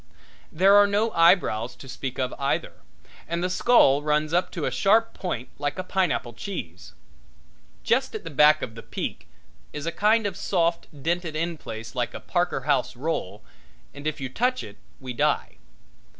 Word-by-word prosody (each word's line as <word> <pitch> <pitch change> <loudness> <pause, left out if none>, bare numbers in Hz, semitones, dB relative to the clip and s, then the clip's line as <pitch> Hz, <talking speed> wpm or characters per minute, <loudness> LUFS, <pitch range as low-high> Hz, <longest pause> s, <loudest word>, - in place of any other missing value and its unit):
There 190 +5 +5
are 205 0 +7
no 210 +3 +1
eyebrows 165 - +3
to 135 - -13
speak 130 0 -6
of 130 -1 -1
either, 140 0 -1 0.5
and 170 +2 -2
the 180 - 0
skull 180 - +4
runs 150 +1 0
up 180 +1 +2
to - - -3
a - - -1
sharp 225 +3 +3
point 130 -10 -4
like 145 -1 -2
a 185 - -3
pineapple 180 -10 -1
cheese. 95 - -7 0.9
Just 260 -1 +1 0.2
back 150 +2 +6
of 110 - -5
the 115 - -9
peak - - -5 0.5
is 150 0 -5
a 165 - -1
kind 210 +5 +2
of 195 -3 -2
soft, 170 -3 0 0.2
dented 170 -1 -1
in 165 +2 -1
place 115 -6 -8
like 125 -2 -2
a - - -5
Parker 175 -6 -1
House 135 -3 0
roll, 120 - -3 0.5
and 145 +1 -6
if 155 - -2
you 135 - -3
touch 250 - 0
it 100 -1 -11 0.2
we 130 -2 -6
die. - - 0
155 Hz, 170 wpm, -25 LUFS, 130-185 Hz, 0.9 s, are